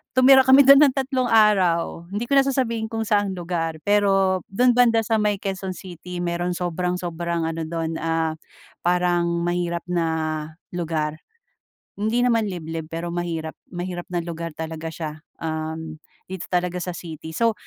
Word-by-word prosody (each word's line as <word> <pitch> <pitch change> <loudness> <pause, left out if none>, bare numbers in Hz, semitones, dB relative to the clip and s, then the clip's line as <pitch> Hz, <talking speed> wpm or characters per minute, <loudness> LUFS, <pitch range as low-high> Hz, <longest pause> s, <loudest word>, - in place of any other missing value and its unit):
tumira 265 +1 +7
kami 265 +2 +8
dun 275 0 +10
ng 280 - +5
tatlong 260 -2 0
araw. 185 -7 +3
Hindi 205 +3 -2
ko 280 - +2
na - - +5
sasabihin 230 -5 0
kung 225 -1 -1
saang 205 -2 +2
lugar, 165 -2 -3
pero 195 -2 +3
dun 245 +5 +4
banda 235 -2 +5
sa 225 - +2
may 210 -1 +2
Quezon 190 -1 -4
City. 180 -1 -8
Merong 175 +1 -1
sobrang 180 0 -1
sobrang 170 -1 -2
ano 165 0 -3
dun, 165 0 -3
ah, 165 -1 0 0.5
parang 175 -1 +1
mahirap 175 -1 -1
na 170 -2 +1 0.7
lugar. 155 -2 -2 0.8
Hindi 220 +4 0
naman 230 -2 +3
liblib, 165 -3 -5
pero 165 +1 -3
mahirap 165 -2 -3 0.2
mahirap 175 0 -4
na 175 - 0
lugar 165 -1 -5
talaga 160 0 -5
siya, 155 -2 -5 0.3
um, 160 0 -4 0.3
dito 190 -1 -6
talaga 180 0 0
sa 180 +1 -3
city. 160 -1 -8
So 230 -1 +3
175 Hz, 155 wpm, -23 LUFS, 165-210 Hz, 0.8 s, dun